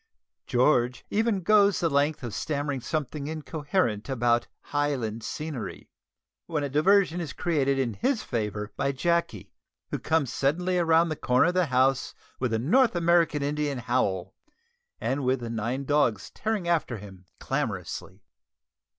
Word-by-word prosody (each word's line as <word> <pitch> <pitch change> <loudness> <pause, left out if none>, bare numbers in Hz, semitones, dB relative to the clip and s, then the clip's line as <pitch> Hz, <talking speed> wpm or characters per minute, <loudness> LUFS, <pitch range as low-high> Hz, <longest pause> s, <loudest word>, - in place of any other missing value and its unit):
George 125 -1 +2
even 215 -2 +1
goes 205 +1 +4
the 170 - +2
length 145 0 +1
of 120 -4 -5
stammering 145 -1 -2
something 145 0 -3
incoherent 150 - -2
about 120 -2 +1
"Highland 135 -7 -2
scenery," 150 -7 -6 0.6
when 155 -4 -1
a 140 - -2
diversion 175 +4 +3
is 160 - -5
created 140 -6 +1
in 125 -4 0
his 250 - 0
favour 105 -2 -3
by 140 - 0
Jacky, 170 +5 -1 0.4
who - - -2
comes 160 -5 0
suddenly 180 +6 +1
round 165 0 +3
the - - -1
corner 125 -1 +3
of - - -1
the 180 -2 +2
house 130 -1 +1 0.2
with 125 -3 -1
a 110 - +1
North 205 - +3
American 170 -3 +3
Indian 145 -1 -1
howl, 95 -6 -1 0.7
and 140 +1 -1
with 130 0 +1
the 115 -1 -4
nine 120 +5 -2
dogs 130 -8 +1
tearing 215 -5 -2
after 160 -8 0
him 95 -3 -12
clamorously. 95 +1 -4
145 Hz, 145 wpm, -27 LUFS, 120-165 Hz, 0.7 s, goes